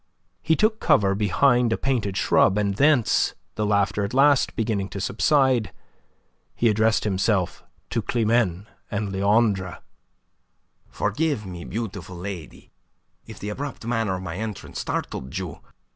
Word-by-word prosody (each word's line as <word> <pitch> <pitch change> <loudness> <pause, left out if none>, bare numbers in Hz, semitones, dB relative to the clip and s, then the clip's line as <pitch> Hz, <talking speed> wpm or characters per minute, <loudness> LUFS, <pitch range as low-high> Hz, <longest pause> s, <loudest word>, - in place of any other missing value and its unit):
He 160 0 +2
took 215 +3 +2
cover 100 -1 +3
behind 115 +5 +2
a 115 - +1
painted 115 -8 -1
shrub, 95 - +3
and 100 -1 +1
thence, 140 +1 +3 0.2
the 105 -1 -1
laughter 100 0 +1
at 100 +5 -3
last 140 0 +4
beginning 105 -4 -1
to 100 - -6
subside, 125 - +2 0.8
he 120 - +2
addressed 110 +1 +2
himself 95 -2 0 0.3
to - - 0
Climene 110 -5 +1 0.2
and 105 -1 -2
Leandre. 100 -1 +1 1.1
"Forgive 145 -8 -1
me, 90 -2 -8
beautiful 100 -4 -5
lady, 90 -3 -8 0.6
if 110 - -10
the 105 - -5
abrupt 135 +2 -6
manner 115 -5 0
of 95 - -6
my 90 -1 -5
entrance 110 -1 -6
startled 65 +5 -4
you. 90 -6 -5
105 Hz, 135 wpm, -24 LUFS, 95-120 Hz, 1.1 s, last